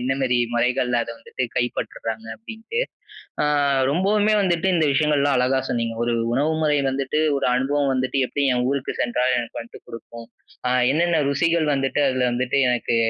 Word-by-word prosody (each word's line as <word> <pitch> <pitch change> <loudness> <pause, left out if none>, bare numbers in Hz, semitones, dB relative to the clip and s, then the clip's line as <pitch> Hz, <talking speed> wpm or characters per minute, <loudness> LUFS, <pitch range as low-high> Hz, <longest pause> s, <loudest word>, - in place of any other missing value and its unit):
என்ன 130 +2 0
மாரி 125 -2 +1 0.2
முறைகள்ல 125 0 +1
அத - - -8
வந்துட்டு 125 +2 -4
கைப்பற்றுறாங்க 115 -2 -3
அப்படின்னுட்டு. 225 - -5 0.6
அ - - +2 0.5
ரொம்பவுமே 205 +6 +2
வந்துட்டு 180 0 +1
இந்த 160 -2 +2
விஷயங்கள்லாம் 145 -1 +2
அழகா 130 +1 +2
சொன்னிங்க. 115 -1 -2
ஒரு 120 0 0 0.2
உணவு 150 +4 +1
முறை 150 -1 +2
வந்துட்டு, 135 +3 -1 0.2
ஒரு 135 - 0
அனுபவம் 135 +2 +1
வந்துட்டு, 130 +1 -1
எப்படி 145 -1 -1
என் 125 0 0
ஊருக்கு 140 -2 -2
சென்றால் 125 +1 +1
எனக்கு 120 -1 -5
வந்துட்டு 115 - -12
குடுக்கும். 115 0 -10 0.4
அ - - 0 0.2
என்னென்ன 165 0 +2
ருசிகள் 165 +3 +1
வந்துட்டு 135 +2 0
அதில 130 -1 0
வந்துட்டு 130 +2 0
எனக்கு 120 -1 0
135 Hz, 160 wpm, -22 LUFS, 125-150 Hz, 0.6 s, அ